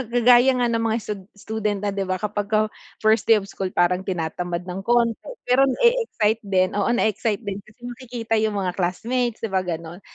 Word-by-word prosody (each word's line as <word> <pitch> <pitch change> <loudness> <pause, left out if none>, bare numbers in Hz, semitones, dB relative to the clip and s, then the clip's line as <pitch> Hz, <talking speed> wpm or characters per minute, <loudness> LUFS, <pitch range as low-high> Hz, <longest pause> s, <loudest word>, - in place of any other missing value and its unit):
ga 240 +2 0
gaya 250 +2 +7
nga 245 -1 +1
ng 230 0 0
mga 225 +1 +1
stud 205 -2 -5
student 210 -1 -3
na, - - +1
'di 195 - -1
ba, 185 - 0
kapagka 210 +1 0 0.3
first 215 0 +3
day 225 -2 +7
of 195 - -9
school 190 -1 -4
parang 180 +1 +2
tinatamad 175 0 -3
ng 180 +2 -4
konti 235 -1 +3 0.3
pero 260 +2 +5
na-e-excite 265 - +2
din, 185 -2 +1
oo 205 - +1
na-e-excite 220 -2 0
din 200 -1 -4
kasi 215 +3 -22
makikita 240 -2 -4
yung 215 -1 0
mga 185 -1 -1
classmates, 230 +6 -1
'di 225 - -1
ba, 190 - +2
ganun? 170 0 -5
215 Hz, 195 wpm, -23 LUFS, 190-235 Hz, 0.3 s, gaya